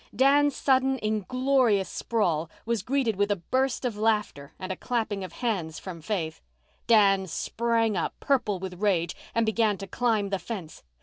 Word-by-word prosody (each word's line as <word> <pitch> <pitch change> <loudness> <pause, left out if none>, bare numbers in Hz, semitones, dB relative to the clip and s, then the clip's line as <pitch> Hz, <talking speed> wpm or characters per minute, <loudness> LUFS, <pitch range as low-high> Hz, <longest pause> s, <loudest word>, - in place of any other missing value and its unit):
Dan's 285 +2 +4
sudden 265 0 +2
inglorious 220 0 +2
sprawl 170 -8 -1 0.2
was 230 -2 0
greeted 240 -2 0
with 205 +1 +1
a 205 - +2
burst 260 +8 -1
of 240 -4 -1
laughter 210 -10 0
and 185 0 -5
a - - -2
clapping 220 -5 -2
of 185 - -7
hands 180 -9 -2
from 175 -4 -8
Faith. 165 -3 -3 0.5
Dan 195 -4 +5
sprang 225 +4 0
up, 170 - -2
purple 245 -8 +1
with 180 0 -7
rage, 175 -5 +1 0.2
and 230 0 +3
began 220 -2 +2
to 195 - -6
climb 215 0 0
the 195 -1 -1
fence. 185 -9 -7
215 Hz, 165 wpm, -27 LUFS, 190-235 Hz, 0.5 s, Dan